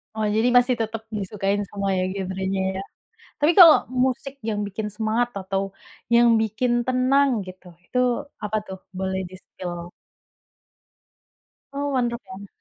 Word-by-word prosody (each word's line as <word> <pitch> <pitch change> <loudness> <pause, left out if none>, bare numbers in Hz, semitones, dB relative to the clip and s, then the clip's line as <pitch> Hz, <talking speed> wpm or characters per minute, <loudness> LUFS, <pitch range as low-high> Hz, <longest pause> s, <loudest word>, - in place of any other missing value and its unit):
Oh, 215 -1 0
Jadi 225 +2 +3
masih 245 +1 +4
tetep 220 0 -3 0.2
disukain 200 0 -1
semua 200 -1 -2
ya, - - +1
genrenya 190 0 -2
ya? 190 - -3 0.6
Tapi 300 +3 +4
kalau 335 -4 +11 0.3
musik 265 +1 -2
yang 210 -1 -1
bikin 210 +2 -4
semangat 225 +2 0
atau 195 0 -2 0.5
yang 235 0 +6
bikin 220 +3 0
tenang 255 +2 +3 0.2
gitu, 185 0 -12 0.2
itu 250 - -3 0.5
apa 210 +1 -1
tuh 190 - -7 0.2
boleh 190 0 -1
di-spill? 175 -2 -8 1.8
Oh 285 0 -2
punk 245 -2 +1
rock 235 +1 -5
ya? 195 +2 -9
215 Hz, 140 wpm, -23 LUFS, 190-245 Hz, 1.8 s, kalau